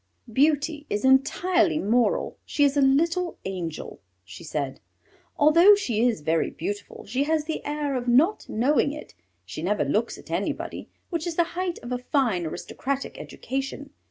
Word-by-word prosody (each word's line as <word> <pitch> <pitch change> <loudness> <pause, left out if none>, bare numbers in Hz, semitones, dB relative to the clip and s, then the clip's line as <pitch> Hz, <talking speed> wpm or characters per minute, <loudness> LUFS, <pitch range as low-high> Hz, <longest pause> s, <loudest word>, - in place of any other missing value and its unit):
"Beauty 295 +2 +1
is 205 +4 -1
entirely 325 +6 +3
moral; 240 -2 +1
she 290 - 0
is 285 0 +3
a 285 - +3
little 335 +6 +2
angel," 175 -5 -5 0.3
she 100 - -11
said. 145 -4 -3 0.6
"Although 335 +7 +7
she 240 - -1
is 225 -10 -1
very 160 +2 +1
beautiful 205 0 -6
she 255 +7 -1
has 310 0 0
the 315 - -4
air 295 -1 -2
of 250 -1 -3
not 300 - +3
knowing 280 +5 +2
it. 300 - -10 0.3
She - - -7
never - - 0
looks - - 0
at - - -13
anybody, - - -3 0.2
which 335 0 -2
is 335 - -3
the 345 - +4
height 360 -1 -2
of 240 - -7
a 250 - -1
fine 240 - 0
aristocratic 275 - -4
education. 270 +2 -5
280 Hz, 160 wpm, -25 LUFS, 240-315 Hz, 0.6 s, Although